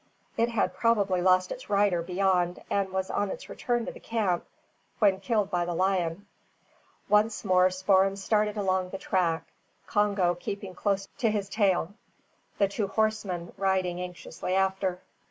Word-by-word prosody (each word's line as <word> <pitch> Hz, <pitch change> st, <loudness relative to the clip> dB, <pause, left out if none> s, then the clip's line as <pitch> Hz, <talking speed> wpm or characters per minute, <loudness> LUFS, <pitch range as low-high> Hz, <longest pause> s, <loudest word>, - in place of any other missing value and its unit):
It 230 Hz, +1 st, +2 dB
had 230 Hz, -3 st, 0 dB
probably 200 Hz, -6 st, +2 dB
lost 185 Hz, 0 st, +3 dB
its 255 Hz, -, -7 dB
rider 200 Hz, -4 st, +2 dB
beyond, 180 Hz, 0 st, 0 dB
and 195 Hz, -1 st, 0 dB
was 190 Hz, 0 st, -2 dB
on 205 Hz, -, 0 dB
its -, -, -7 dB
return 240 Hz, -2 st, -1 dB
to -, -, -4 dB
the -, -, -12 dB
camp 205 Hz, -7 st, -1 dB, 0.5 s
when 195 Hz, -3 st, +3 dB
killed 210 Hz, -1 st, 0 dB
by 175 Hz, -1 st, +1 dB
the 175 Hz, 0 st, -3 dB
lion. 185 Hz, 0 st, 0 dB, 0.8 s
Once 210 Hz, +2 st, +2 dB
more 185 Hz, 0 st, +5 dB
Spoor'em 190 Hz, +1 st, +2 dB
started 210 Hz, +1 st, 0 dB
along 185 Hz, -2 st, 0 dB
the 195 Hz, -, -5 dB
track, 175 Hz, -4 st, 0 dB, 0.4 s
Congo 200 Hz, -4 st, +2 dB
keeping 190 Hz, +2 st, -6 dB
close 195 Hz, 0 st, -1 dB
to 235 Hz, -4 st, +2 dB
his 205 Hz, -2 st, -1 dB
tail, 195 Hz, -3 st, +1 dB, 0.6 s
the 200 Hz, -, +3 dB
two 200 Hz, +1 st, -2 dB
horsemen 200 Hz, -5 st, -1 dB
riding 185 Hz, -2 st, 0 dB
anxiously 180 Hz, 0 st, -5 dB
after. 190 Hz, -1 st, 0 dB
190 Hz, 155 wpm, -28 LUFS, 180-205 Hz, 0.8 s, more